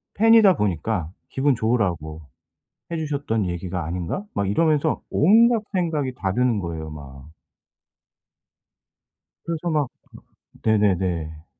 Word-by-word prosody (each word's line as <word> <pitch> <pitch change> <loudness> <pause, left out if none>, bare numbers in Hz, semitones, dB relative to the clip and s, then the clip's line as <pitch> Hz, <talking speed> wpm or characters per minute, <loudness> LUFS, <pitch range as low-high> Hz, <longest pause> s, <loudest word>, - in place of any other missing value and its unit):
팬이다 220 -3 +6
보니까 90 -2 -1 0.2
'기분 135 0 +1
좋으라고 95 -10 -1 0.7
해 170 - -2
주셨던 140 - -2
얘기가 90 -1 -4
아닌가?' 90 - -3
막 100 -1 -1
이러면서 155 +6 +1
온갖 225 +7 +4
생각이 160 -8 -1
다 95 -5 -2
드는 125 -1 +1
거예요 80 -3 -5
막. 70 -2 -11 2.2
그래서 170 +1 -3
막 150 -4 +1 0.8
네네네. 90 -7 0
110 Hz, 240 characters per minute, -23 LUFS, -, 2.2 s, 팬이다